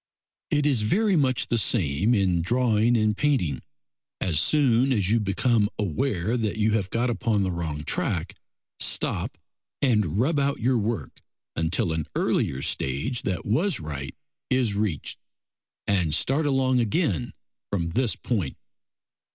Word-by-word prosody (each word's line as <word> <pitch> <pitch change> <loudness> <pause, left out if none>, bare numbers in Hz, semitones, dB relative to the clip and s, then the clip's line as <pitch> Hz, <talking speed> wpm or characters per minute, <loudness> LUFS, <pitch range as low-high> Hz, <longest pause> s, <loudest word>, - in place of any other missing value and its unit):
It 145 -1 +1
is 135 -6 +3
very 200 - +2
much 130 -5 +1
the 120 - +2
same 100 - +1
in 95 -4 +2
drawing 120 +2 +2
and 110 -1 +2
painting. 105 - 0 0.6
As 80 -5 +1
soon 135 - +3
as 105 -5 +1
you 115 - +4
become 105 +1 +1
aware 105 - -1
that 110 -2 -2
you 110 0 +2
have 100 -4 0
got 120 +3 0
upon 110 -3 0
the 95 - -1
wrong 80 -4 -4
track, - - -2 0.5
stop - - 0 0.4
and 105 - +1
rub 145 +6 +2
out 140 0 0
your 125 +1 +2
work 105 - -3 0.3
until 80 0 0
an 80 -2 -3
earlier 65 0 0
stage 70 - -1
that 95 -2 -3
was 165 - +1
right 70 -4 -5 0.3
is 125 -5 +2
reached, 100 -7 -2 0.7
and 90 -7 +1
start 145 - +1
along 130 -2 +2
again 120 - 0 0.4
from 85 -4 -1
this 120 +6 0
point. 100 - -2
110 Hz, 145 wpm, -25 LUFS, 90-125 Hz, 0.7 s, you